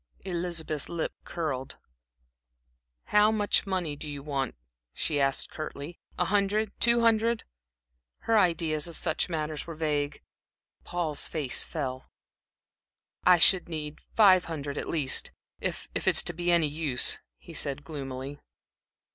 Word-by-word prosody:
Elizabeth's 170 Hz, -4 st, -3 dB
lip 170 Hz, -2 st, -2 dB
curled. 140 Hz, -6 st, -3 dB, 1.4 s
"How 210 Hz, +1 st, +6 dB
much 210 Hz, -1 st, +2 dB
money 180 Hz, -6 st, -1 dB
do 150 Hz, +1 st, -6 dB
you 140 Hz, -1 st, -6 dB
want?" 140 Hz, -4 st, -2 dB, 0.4 s
she 150 Hz, -2 st, 0 dB
asked, 135 Hz, 0 st, +1 dB
curtly. 155 Hz, +1 st, -6 dB, 0.2 s
"A 180 Hz, -, +2 dB
hundred? 205 Hz, +2 st, +1 dB
Two 235 Hz, 0 st, +4 dB
hundred?" 230 Hz, 0 st, +3 dB, 0.8 s
Her 225 Hz, -, +1 dB
ideas 165 Hz, -5 st, +2 dB
on 170 Hz, -, -7 dB
such 160 Hz, +1 st, 0 dB
matters 155 Hz, -2 st, -3 dB
were 165 Hz, -, -6 dB
vague. 150 Hz, -2 st, -1 dB, 0.6 s
Paul's 165 Hz, -4 st, -2 dB
face 145 Hz, -5 st, +1 dB
fell. 130 Hz, -5 st, -4 dB, 1.2 s
"I 180 Hz, -1 st, +8 dB
should 175 Hz, +1 st, +4 dB
need 155 Hz, -2 st, -5 dB, 0.2 s
five 190 Hz, -4 st, +7 dB
hundred 145 Hz, -4 st, -4 dB
at -, -, -4 dB
least, 145 Hz, -5 st, +1 dB, 0.3 s
if -, -, -3 dB
if -, -, -1 dB
it -, -, +5 dB
is -, -, +6 dB
to 175 Hz, -, -1 dB
be 175 Hz, +1 st, -2 dB
of 175 Hz, -, +6 dB
any 165 Hz, -3 st, +3 dB
use," 145 Hz, -4 st, +1 dB, 0.2 s
he -, -, -13 dB
said, 140 Hz, 0 st, -2 dB
gloomily. 135 Hz, -2 st, -6 dB
160 Hz, 140 wpm, -28 LUFS, 145-180 Hz, 1.4 s, I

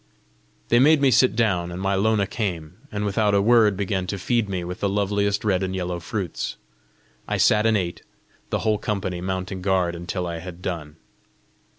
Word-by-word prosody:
They 120 Hz, -, +5 dB
made 150 Hz, +4 st, +6 dB
me 140 Hz, -2 st, +4 dB
sit 125 Hz, 0 st, +4 dB
down, 95 Hz, -7 st, +1 dB
and 85 Hz, -, -6 dB
my 95 Hz, +1 st, 0 dB
Lona 100 Hz, +1 st, +2 dB
came, 90 Hz, -8 st, -4 dB, 0.2 s
and 105 Hz, 0 st, -2 dB
without 105 Hz, 0 st, +1 dB
a -, -, +4 dB
word 110 Hz, -2 st, +4 dB
began 95 Hz, -2 st, -1 dB
to 100 Hz, -, -3 dB
feed 115 Hz, +2 st, 0 dB
me 90 Hz, -2 st, -2 dB
with 90 Hz, +1 st, -6 dB
the 100 Hz, -, 0 dB
loveliest 100 Hz, +1 st, 0 dB
red 95 Hz, -3 st, +2 dB
and 95 Hz, 0 st, -2 dB
yellow 90 Hz, -1 st, -3 dB
fruits. 90 Hz, -1 st, -4 dB, 0.7 s
I -, -, -1 dB
sat 105 Hz, +1 st, +4 dB
and 110 Hz, -1 st, +3 dB
ate, 85 Hz, -3 st, -3 dB, 0.5 s
the -, -, -1 dB
whole 110 Hz, -1 st, +2 dB
colony 95 Hz, -5 st, -3 dB
mounting 95 Hz, 0 st, -3 dB
guard 90 Hz, -2 st, +1 dB
until 85 Hz, +2 st, -4 dB
I 85 Hz, -1 st, -4 dB
had 90 Hz, +1 st, -9 dB
done. 75 Hz, -4 st, -4 dB
95 Hz, 190 wpm, -23 LUFS, 90-105 Hz, 0.7 s, made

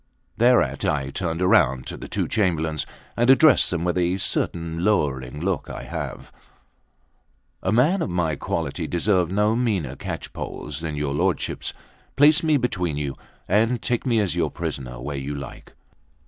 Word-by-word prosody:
Thereat 120 Hz, +1 st, +3 dB
I 70 Hz, -2 st, 0 dB
turned 85 Hz, +1 st, -2 dB
round 65 Hz, -8 st, +3 dB
to -, -, -5 dB
the -, -, -8 dB
two -, -, -1 dB
Chamberlains, 80 Hz, -7 st, 0 dB, 0.3 s
and 120 Hz, +2 st, +2 dB
addressed 135 Hz, +1 st, +6 dB
them 85 Hz, -2 st, -1 dB
with 90 Hz, +1 st, 0 dB
a 90 Hz, +1 st, +1 dB
certain 85 Hz, -2 st, -1 dB
lowering 75 Hz, -9 st, 0 dB
look 90 Hz, +1 st, -2 dB
I -, -, -6 dB
have: -, -, -6 dB, 1.3 s
"A 95 Hz, -, 0 dB
man 150 Hz, -, +3 dB
of -, -, -1 dB
my 85 Hz, -3 st, 0 dB
quality -, -, -3 dB
deserved 90 Hz, 0 st, +1 dB
no 105 Hz, +3 st, +2 dB
meaner 100 Hz, -, 0 dB
catchpoles 75 Hz, +1 st, -6 dB
than 80 Hz, -2 st, -3 dB
your 75 Hz, -1 st, -2 dB
lordships: 90 Hz, +5 st, -1 dB, 0.4 s
place 150 Hz, +2 st, +6 dB
me 155 Hz, -2 st, +3 dB
between 90 Hz, -, -1 dB
you, 70 Hz, -2 st, -2 dB, 0.3 s
and 115 Hz, +5 st, +2 dB
take 120 Hz, -2 st, -1 dB
me 120 Hz, -3 st, +2 dB
as 95 Hz, -5 st, 0 dB
your 85 Hz, -3 st, +1 dB
prisoner 60 Hz, -3 st, -5 dB
where 70 Hz, +3 st, -4 dB
you 70 Hz, +2 st, -4 dB
like." 70 Hz, -2 st, -9 dB
90 Hz, 160 wpm, -23 LUFS, 75-110 Hz, 1.3 s, addressed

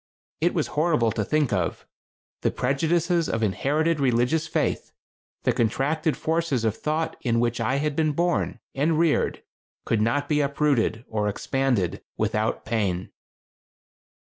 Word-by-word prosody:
It 170 Hz, +2 st, +1 dB
was 160 Hz, -, 0 dB
horrible 150 Hz, -7 st, +2 dB
to 110 Hz, 0 st, -1 dB
think 150 Hz, +1 st, +1 dB
of. 90 Hz, -4 st, -1 dB, 0.6 s
The -, -, +2 dB
prejudices 165 Hz, +5 st, +1 dB
of 115 Hz, -, -1 dB
inherited 150 Hz, -, +1 dB
religious 135 Hz, +5 st, +2 dB
faith, -, -, -1 dB, 0.5 s
the -, -, +3 dB
contracted 145 Hz, +7 st, 0 dB
forces 160 Hz, -7 st, 0 dB
of 110 Hz, -1 st, +1 dB
thought 155 Hz, +1 st, -2 dB
in 115 Hz, -2 st, +1 dB
which 120 Hz, 0 st, 0 dB
I 125 Hz, +4 st, +1 dB
had 145 Hz, +1 st, -1 dB
been 155 Hz, -1 st, +1 dB
born 175 Hz, +3 st, 0 dB
and 155 Hz, +3 st, +1 dB
reared 165 Hz, -2 st, +1 dB, 0.4 s
could 110 Hz, -2 st, +1 dB
not 140 Hz, +6 st, +1 dB
be 150 Hz, -1 st, +2 dB
uprooted 140 Hz, -5 st, +1 dB
or 105 Hz, -1 st, -1 dB
expanded 105 Hz, -4 st, 0 dB, 0.2 s
without 110 Hz, 0 st, -1 dB
pain. 100 Hz, -5 st, -1 dB
140 Hz, 140 wpm, -25 LUFS, 115-155 Hz, 0.6 s, the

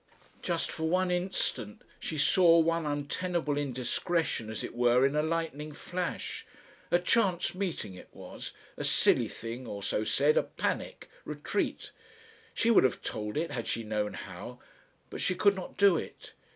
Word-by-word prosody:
Just -, -, -1 dB
for 160 Hz, -, -3 dB
one 185 Hz, +1 st, +2 dB
instant 180 Hz, -, -2 dB, 0.2 s
she 155 Hz, -, -4 dB
saw 170 Hz, +3 st, +6 dB
one 165 Hz, -1 st, +2 dB
untenable 150 Hz, +2 st, -1 dB
indiscretion 140 Hz, -1 st, -1 dB
as 110 Hz, -, -4 dB
it -, -, -5 dB
were 120 Hz, +2 st, +4 dB
in 140 Hz, +2 st, +1 dB
a 150 Hz, -, +3 dB
lightning 155 Hz, -2 st, -2 dB
flash. 180 Hz, +3 st, -4 dB, 0.5 s
A -, -, +5 dB
chance 180 Hz, 0 st, +2 dB
meeting 180 Hz, -, -3 dB
it 90 Hz, -, -12 dB
was, -, -, -8 dB, 0.3 s
a -, -, -3 dB
"silly" -, -, +4 dB
thing 115 Hz, +2 st, -7 dB
or 100 Hz, -2 st, -6 dB
so 105 Hz, -, 0 dB
said, 145 Hz, +7 st, +3 dB
a -, -, +6 dB
panic, -, -, -3 dB, 0.2 s
retreat. -, -, -2 dB, 0.6 s
She 230 Hz, -, +3 dB
would 225 Hz, -, +6 dB
have 130 Hz, -, +1 dB
told 105 Hz, +2 st, -3 dB
it 165 Hz, +2 st, -1 dB
had 120 Hz, -2 st, -4 dB
she 115 Hz, -, -1 dB
known 105 Hz, -1 st, -1 dB
how. 95 Hz, +7 st, -8 dB, 0.5 s
But -, -, -5 dB
she 185 Hz, -, +1 dB
could 200 Hz, +2 st, +4 dB
not 185 Hz, -, -7 dB
do 200 Hz, -4 st, +6 dB
it. -, -, -8 dB
150 Hz, 165 wpm, -30 LUFS, 120-180 Hz, 0.6 s, saw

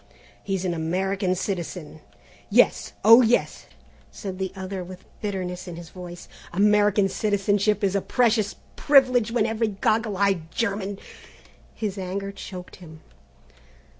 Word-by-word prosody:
"He's 195 Hz, -2 st, -2 dB
an 180 Hz, -, 0 dB
American 185 Hz, +3 st, -1 dB
citizen." 175 Hz, -4 st, -5 dB, 0.5 s
"Yes, -, -, +3 dB
oh 230 Hz, +3 st, +9 dB
yes," 240 Hz, 0 st, +1 dB, 0.4 s
said 190 Hz, -3 st, -7 dB
the 190 Hz, -1 st, -2 dB
other 190 Hz, 0 st, -5 dB
with 185 Hz, +1 st, -11 dB, 0.2 s
bitterness. 185 Hz, -3 st, -4 dB, 0.8 s
"American 205 Hz, +1 st, +3 dB
citizenship 205 Hz, +1 st, +1 dB
is 195 Hz, 0 st, +1 dB
a 200 Hz, -, +2 dB
precious 220 Hz, -3 st, +1 dB, 0.2 s
privilege 255 Hz, -5 st, +4 dB
when 230 Hz, -3 st, +2 dB
every 225 Hz, 0 st, 0 dB
goggle 215 Hz, +1 st, 0 dB
eyed 190 Hz, -5 st, +1 dB
German 200 Hz, -1 st, -2 dB, 0.4 s
" -, -, -25 dB, 0.3 s
His 205 Hz, -3 st, -3 dB
anger 195 Hz, +2 st, -4 dB
choked 185 Hz, -2 st, -9 dB
him. 160 Hz, -3 st, -13 dB
195 Hz, 120 wpm, -24 LUFS, 185-215 Hz, 0.8 s, oh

